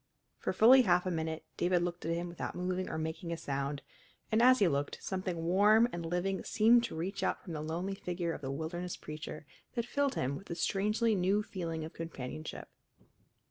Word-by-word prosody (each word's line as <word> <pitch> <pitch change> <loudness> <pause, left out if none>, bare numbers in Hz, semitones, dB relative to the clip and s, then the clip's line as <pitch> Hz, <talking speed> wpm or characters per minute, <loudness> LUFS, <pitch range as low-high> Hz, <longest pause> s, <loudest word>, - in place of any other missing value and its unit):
For - - -1
fully 255 +4 +7
half 180 -5 +3
a 185 - 0
minute 160 -1 -3
David 175 0 +2
looked 175 -1 -3
at 165 - +1
him 170 +1 -3
without 170 0 -5
moving 180 +1 -2
or - - -3
making 160 +2 -4
a 170 - -2
sound, 140 -1 -3 0.5
and 220 +1 +4
as 255 +1 +7
he 200 - +4
looked, 140 -2 -1
something 185 -3 -3
warm 210 +6 +5
and 175 - -4
living 180 +3 -1
seemed 230 +2 +5
to 235 - -6
reach 180 +5 -3
out - - 0
from 175 - -7
the 150 - -3
lonely 170 +5 -3
figure 175 -3 -3
of - - -7
the 135 - -4
wilderness 170 +5 -4
preacher 155 0 -7 0.3
that 235 -1 0
filled 280 +2 0
him 130 +2 -1
with 195 - -10
a 170 - -3
strangely 210 +6 +1
new 195 +2 +2
feeling 165 -5 -4
of 160 - -9
companionship. 155 -2 -6
175 Hz, 200 wpm, -32 LUFS, 160-195 Hz, 0.5 s, fully